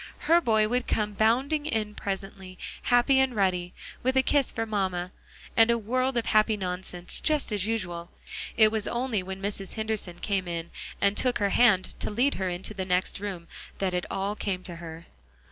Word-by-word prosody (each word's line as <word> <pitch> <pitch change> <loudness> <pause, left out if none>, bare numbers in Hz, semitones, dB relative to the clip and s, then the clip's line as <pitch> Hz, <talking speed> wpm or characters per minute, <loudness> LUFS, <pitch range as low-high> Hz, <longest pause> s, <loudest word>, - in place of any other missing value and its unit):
Her 335 +2 +4
boy 220 -6 +3
would 245 +2 -1
come 210 -1 0
bounding 265 +9 +2
in 215 -5 -1
presently, 195 -2 -5 0.2
happy 250 +2 +4
and 265 -2 +2
ruddy, 180 -3 +1 0.3
with 260 +1 +1
a 265 - +5
kiss 280 -1 +3
for 225 - -2
mamma, 185 -4 -1 0.4
and 225 0 +6
a 235 - +4
world 255 +4 0
of 235 - 0
happy 215 0 +3
nonsense, 180 -1 -4
just 305 -6 +1
as 205 -1 0
usual. 175 -6 -3 0.5
It 215 -1 +7
was 220 -2 -1
only 240 -4 -1
when 190 +1 -7
Mrs. 200 -1 -4
Henderson 220 -5 -2
came 195 -2 -1
in, 170 -1 -4 0.3
and 200 0 +3
took 250 +2 +1
her 200 -1 +1
hand 210 -6 +4
to - - -2
lead 245 +7 +2
her 185 - +1
into 180 +4 -4
the 195 -2 -3
next 180 +1 0
room, 190 -4 -5 0.3
that 190 -2 -1
it 180 0 -1
all 195 +2 -2
came 190 -3 -3
to 170 -2 -5
her. 165 0 -9
205 Hz, 190 wpm, -27 LUFS, 185-235 Hz, 0.5 s, It